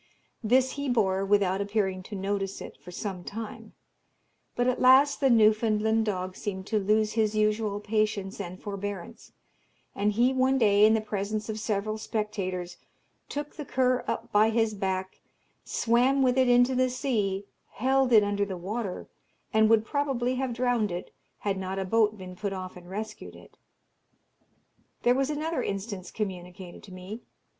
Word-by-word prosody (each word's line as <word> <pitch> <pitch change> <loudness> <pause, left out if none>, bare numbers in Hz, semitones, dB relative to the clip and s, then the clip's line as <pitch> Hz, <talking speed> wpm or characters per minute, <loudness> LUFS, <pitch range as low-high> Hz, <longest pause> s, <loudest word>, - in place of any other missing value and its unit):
This 255 +4 +3
he 285 -1 -3
bore, 195 -5 +2
without 195 -1 +2
appearing 200 -2 -1
to 210 - -5
notice 195 0 -2
it, - - -9
for - - -12
some 185 0 -5
time; 220 +3 -7 0.8
but 245 - +1
at 255 0 0
last 265 +3 +6
the 270 - +3
Newfoundland 220 -1 +3
dog 185 -2 -2
seemed 190 -2 -5
to 215 +1 0
lose 215 +2 +2
his 215 -1 +1
usual 215 -1 +1
patience 210 -2 -1
and 185 -1 -7
forbearance, 205 +1 -6 0.6
and 205 +1 0
he 245 +5 +3
one 260 +1 +2
day, 210 -3 +5
in 220 - +4
the 220 - +1
presence 210 +1 -3
of 220 0 -3
several 215 0 -2
spectators, 185 -5 -3 0.5
took 290 0 -5
the 300 - -4
cur 255 -2 +1
up - - -3
by 215 +1 +5
his 225 -1 +1
back, 190 -2 -3 0.4
swam 250 +4 +2
with 250 -1 +3
it 260 -1 +3
into 245 +1 +5
the 255 0 +2
sea, 215 -7 -1 0.3
held 265 +1 +2
it 215 -3 +7
under 205 0 0
the 195 -2 -4
water, 195 +2 -4 0.5
and 220 0 +5
would 225 -1 +4
probably 265 -2 0
have 260 0 -2
drowned 240 -4 0
it, 175 +1 -6 0.3
had 195 -2 -1
not 190 0 -4
a 190 - -1
boat 215 +1 +2
been 185 -1 -9
put 200 +1 -3
off 185 -1 -6
and 175 -1 -12
rescued 215 +2 -6
it. - - -16 1.5
There 245 - +5
was 270 +2 0
another 310 +2 -2
instance 195 -2 -4
communicated 180 -3 -6
to 195 - -14
me. 185 +5 -8
215 Hz, 165 wpm, -28 LUFS, 195-240 Hz, 1.5 s, it